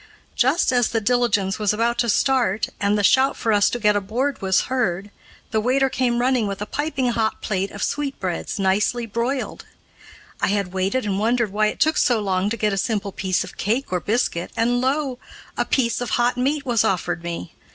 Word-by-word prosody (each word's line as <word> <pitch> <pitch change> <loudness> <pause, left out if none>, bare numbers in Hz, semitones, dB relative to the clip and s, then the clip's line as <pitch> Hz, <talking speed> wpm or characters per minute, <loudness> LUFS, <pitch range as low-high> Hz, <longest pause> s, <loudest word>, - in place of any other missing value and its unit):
Just 265 +4 +2
as 245 -2 +3
the 225 - 0
diligence 215 -4 +1
was 210 -1 +1
about 235 +2 0
to 235 - +1
start, 235 -3 +1
and 205 +1 +1
the 205 - 0
shout 265 +6 +4
for 225 -2 0
us 205 -1 +4
to - - -2
get 210 -3 +2
aboard 230 +8 -1
was 190 -1 +2
heard, 205 -6 -2 0.4
the 220 - +1
waiter 265 +3 +2
came 245 -2 0
running 250 -3 +2
with 200 -1 -4
a 210 - -3
piping 285 -1 -1
hot 220 -1 -1
plate 195 -2 -1
of 205 - -6
sweetbreads 270 -12 -3
nicely 205 +5 +1
broiled. 235 +4 -3 0.8
I - - +2
had 200 -2 -1
waited 195 +7 0
and 195 -1 -1
wondered 230 0 +1
why 215 +1 +2
it - - -4
took 315 0 +3
so 240 -3 +3
long 195 -1 0
to 230 - -3
get 210 -2 0
a - - -2
simple 205 -1 -1
piece 185 -1 -1
of - - -11
cake 225 +2 -1
or 180 - +1
biscuit, 205 -5 -1
and 245 +2 +2
lo! 265 -1 -1 0.4
a - - 0
piece 240 -3 0
of 245 - -3
hot 240 +1 +2
meat 280 +4 0
was 235 -5 +2
offered 175 -2 -1
me. 170 - -6
225 Hz, 205 wpm, -22 LUFS, 200-250 Hz, 0.8 s, shout